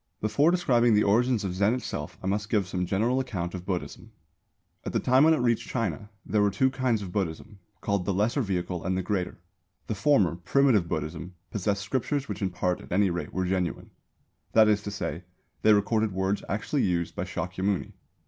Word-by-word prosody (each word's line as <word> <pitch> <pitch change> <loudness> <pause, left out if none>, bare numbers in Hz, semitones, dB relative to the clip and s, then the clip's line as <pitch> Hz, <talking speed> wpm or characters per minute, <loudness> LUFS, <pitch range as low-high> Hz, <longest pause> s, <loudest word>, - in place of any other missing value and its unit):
Before 140 +9 +3
describing 120 -10 +3
the 105 - +4
origins 115 +2 +2
of 95 -2 -2
Zen 100 +5 +2
itself 75 -12 -5
I - - -5
must 105 +2 -1
give 105 -4 +2
some 90 -1 -2
general 115 +8 +1
account 95 -10 -3
of 90 -1 -7
Buddhism. 90 -3 -4 0.7
At - - -5
the - - +2
time 130 +3 +4
when 160 0 +6
it 150 - -2
reached 120 -2 +1
China 115 -3 -2 0.2
there 105 - +1
were 105 - +4
two 130 +7 +2
kinds 125 -5 0
of 90 - -7
Buddhism, 95 +1 -4 0.2
called 100 -3 -1
the - - 0
Lesser 105 +8 +1
Vehicle 90 -4 -2
and 95 0 -1
the 95 - -1
Greater. 95 -2 -2 0.5
The - - -2
former, 105 - +2
Primitive 110 0 +3
Buddhism, 80 +3 -4 0.2
possessed 100 0 -1
scriptures 135 +5 -1
which - - -5
in 95 - +1
part 90 0 -1
at - - -14
any 95 +1 +3
rate 85 0 -4
were 95 0 -1
genuine; 90 -3 -2 0.6
that 110 -1 +6
is 105 -1 +3
to 105 - -5
say, 90 -4 -4 0.4
they 110 - +5
recorded 105 0 +2
words 95 +2 -1
actually 110 +8 -1
used 85 -2 0
by - - -2
Shākyamuni. 95 +3 -2
100 Hz, 195 wpm, -27 LUFS, 90-115 Hz, 0.7 s, when